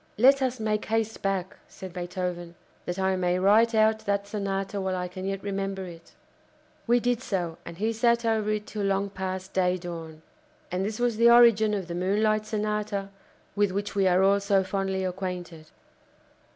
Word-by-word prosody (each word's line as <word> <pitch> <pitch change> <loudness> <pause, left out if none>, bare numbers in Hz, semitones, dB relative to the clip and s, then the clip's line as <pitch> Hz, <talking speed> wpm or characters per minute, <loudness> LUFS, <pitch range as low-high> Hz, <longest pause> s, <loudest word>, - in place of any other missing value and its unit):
"Let 270 +5 +6
us 255 -2 -1
make 215 -1 -1
haste 225 0 -1
back," 195 -1 -2
said 185 -2 -10
Beethoven, 175 -1 -4 0.3
"that 175 - -3
I 190 0 +1
may 180 -1 +1
write 215 +5 +4
out 220 0 +4
that 200 0 0
Sonata 195 -1 -3
while 190 -1 -1
I 180 0 -2
can 185 +1 -7
yet 195 0 -3
remember 195 -1 -3
it." 165 -2 -12 0.7
We 240 +1 +4
did 245 0 0
so, 175 -8 -3
and 170 - -8
he 220 +4 0
sat 235 +1 +2
over 220 -2 +1
it 210 0 -1
till 215 - -5
long 195 0 0
past 190 -1 -5
day 185 -1 +2
dawn. 165 -3 -8 0.5
And 180 +1 -1
this 215 +2 -3
was 240 -2 0
the 235 +1 +6
origin 230 -3 +6
of 190 -4 -4
the 170 - -5
Moonlight 215 +4 +1
Sonata 210 -2 -2 0.5
with 205 -1 +2
which 200 +2 -3
we 195 -1 +2
are 185 +1 +4
all 200 +1 +4
so 200 -1 +2
fondly 190 0 -2
acquainted. 180 -3 -5
195 Hz, 180 wpm, -27 LUFS, 185-215 Hz, 0.7 s, Let